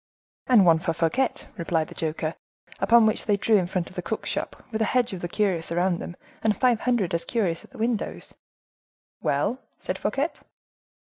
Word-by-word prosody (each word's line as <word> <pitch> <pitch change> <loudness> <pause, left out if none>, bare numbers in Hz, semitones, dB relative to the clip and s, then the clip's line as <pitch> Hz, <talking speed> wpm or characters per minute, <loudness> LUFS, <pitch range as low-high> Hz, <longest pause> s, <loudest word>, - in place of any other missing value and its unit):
'And 230 -7 +6
one 165 -2 +6
for 165 0 -1
Fouquet,' 170 +11 0
replied 165 -2 0
the - - -9
joker. 160 0 -2 0.5
Upon 225 +4 +6
which 215 - +1
they 205 -2 +3
drew 215 +2 +4
in 180 -3 +1
front 180 -1 -2
of - - -17
the - - -2
cook's - - -3
shop, - - -4
with 220 0 -2
a - - +4
hedge 245 +1 +1
of 180 - -5
the 175 - -2
curious 175 -4 0
round 175 +1 +1
them, 175 - -6 0.3
and 215 -3 +2
five 245 -3 +3
hundred 230 -9 +1
as 170 0 +1
curious 180 -4 -1
at - - -16
the 265 - -14
windows." 230 -1 -2 0.9
"Well?" 255 - 0 0.2
said - - -4
Fouquet. 285 +4 0
195 Hz, 195 wpm, -25 LUFS, 170-230 Hz, 0.9 s, And